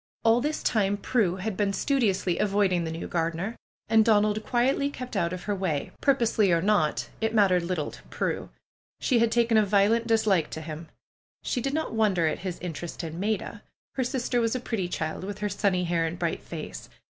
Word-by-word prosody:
All 230 +1 +4
this 300 +3 -2
time 205 -3 +1
Prue 200 -4 +1
had 195 +2 -3
been 200 0 0
studiously 195 - +1
avoiding 195 -4 +2
the 160 - -3
new 165 - -5
gardener. 170 +6 -2 0.3
And 220 0 +5
Donald 215 -1 +3
quietly 265 +4 +1
kept 255 -4 -7
out 170 -4 +1
of 185 0 -5
her 205 - -1
way, 180 -7 -2
purposely 230 -8 +3
or 170 - +4
not, 190 -4 +1
it 220 0 0
mattered 190 -4 +4
little 170 -3 -2
to - - -13
Prue. - - -2 0.5
She 250 -4 +2
had 230 0 +3
taken 230 -1 +3
a 215 - +6
violent 210 +3 +3
dislike 215 -8 +2
to 160 - -6
him. 155 +1 -7 0.5
She 245 - -1
did 275 +4 -1
not 315 -5 -2
wonder 205 -6 +2
at 155 - 0
his 180 -1 -4
interest 170 0 -5
in 165 +1 -5
Maida. 205 0 -2 0.3
Her 260 - 0
sister 245 -1 0
was 230 +1 0
a - - 0
pretty 225 -7 -2
child, 160 -1 -3
with 200 +1 -5
her 210 0 -2
sunny 195 -2 +1
hair 170 -1 +1
and 165 +2 -5
bright 170 -2 -2
face. 155 - -8
200 Hz, 200 wpm, -27 LUFS, 175-225 Hz, 0.5 s, a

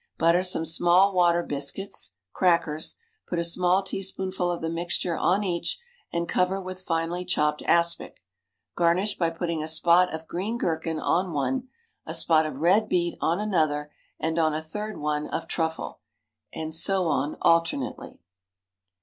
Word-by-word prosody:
Butter 170 +2 +4
some 180 -3 0
small 175 +4 +4
water 175 -1 +3
biscuits 145 - -2 0.2
(crackers), 170 -4 +1 0.3
put 175 - -3
a 170 - +1
small 180 +3 +2
teaspoonful 190 -1 -3
of 175 - -3
the 165 - -3
mixture 170 0 -1
on 190 +6 +1
each, 170 -3 -1 0.3
and 170 0 -2
cover 185 +2 +1
with 185 -1 -7
finely 170 0 -2
chopped 150 -4 0
aspic. 170 - +2 0.5
Garnish 180 +4 +2
by 170 -2 +2
putting 165 -1 -3
a 155 - -4
spot 170 +3 +4
of 160 0 -6
green 200 +7 -3
gherkin 160 -5 -2
on 180 +2 0
one, 260 - -1 0.4
a - - -3
spot 160 -1 +4
of 145 -2 -7
red 200 +6 +3
beet 175 -1 0
on 170 +3 +1
another, 155 -8 0 0.3
and 160 +1 -1
on 155 -2 +2
a 155 - -2
third 210 +7 -6
one 150 0 -2
of - - -4
truffle, 160 -1 -3 0.5
and 160 0 -5
so 185 +3 +2
on 150 -2 -1
alternately. 165 - 0
170 Hz, 155 wpm, -26 LUFS, 160-185 Hz, 0.5 s, Butter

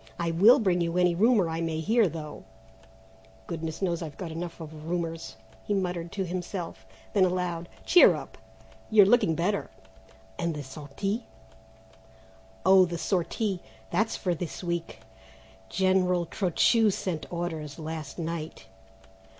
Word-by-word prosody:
I 170 -1 -1
will 205 +10 +7
bring 185 -8 +1
you 170 +1 -1
any 180 -1 +4
rumour 210 0 +4
I 165 0 -3
may 165 -1 -2
hear, 220 +6 +3
though 150 -2 -7 1.0
goodness 165 +1 -5
knows 175 -2 0
I've 155 -4 -7
got 170 -3 -5
enough 170 +1 -6
of 155 0 -9
rumours," 165 -2 -3 0.3
he 205 - -1
muttered 175 -3 -2
to 195 -2 -2
himself. 175 - -5 0.3
Then - - +4
aloud: 180 -2 -1 0.2
"Cheer 355 - +7
up; - - -8 0.5
you're 215 -2 +7
looking 210 -6 +4
better." 190 +5 -1 0.7
"And 170 -2 -1
the 145 - -5
sortie?" 150 - -4 1.4
"Oh, 190 0 +7
the 170 -1 -4
sortie, 185 +2 -1 0.3
that's 220 +6 +1
for 180 -3 -1
this 175 +2 -5
week. 170 -1 -3 0.7
General 185 -1 +2
Trochu 210 +6 +3
sent 185 -5 -3
orders 160 -4 -4
last 155 -2 -6
night." 165 -3 -5
175 Hz, 135 wpm, -28 LUFS, 165-190 Hz, 1.4 s, will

